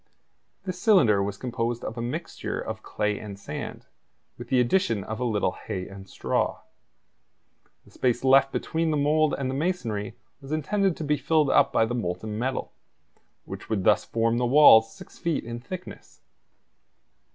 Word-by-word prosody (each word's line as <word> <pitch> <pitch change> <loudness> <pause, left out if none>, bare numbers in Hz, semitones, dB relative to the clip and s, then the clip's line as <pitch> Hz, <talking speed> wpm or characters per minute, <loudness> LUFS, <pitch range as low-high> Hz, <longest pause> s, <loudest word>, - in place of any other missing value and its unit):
This 180 -1 -5
cylinder 145 - +5
was 100 +1 -3
composed 120 -1 -3
of 110 - -5
a 120 - -4
mixture 120 +1 -4
of - - -5
clay 105 -1 -2
and 100 -2 -8
sand, - - -7 0.5
with - - -9
the 130 - +3
addition 120 - +1
of 110 +2 -6
a - - -1
little 110 -4 0
hay 90 0 -6
and 95 0 -11
straw. - - -1 1.2
The - - -20
space 125 -1 0
left 135 +1 +5
between 165 0 -1
the 155 - +1
mould 150 +1 +2
and 135 - -2
the 130 - -2
masonry 120 - -2 0.3
was 135 +1 -10
intended 190 +4 0
to - - -5
be 150 0 +1
filled 155 -3 +2
up - - +4
by 115 - +3
the 115 - -4
molten 105 -1 -3
metal, 130 +2 -3 0.7
which - - -9
would 105 -4 -1
thus 105 - +4
form 115 +1 0
the 125 - +1
walls 120 -5 +7
six - - -14
feet 170 -3 -1
in 120 0 -6
thickness. 180 +9 -10
125 Hz, 170 wpm, -26 LUFS, 110-150 Hz, 1.2 s, walls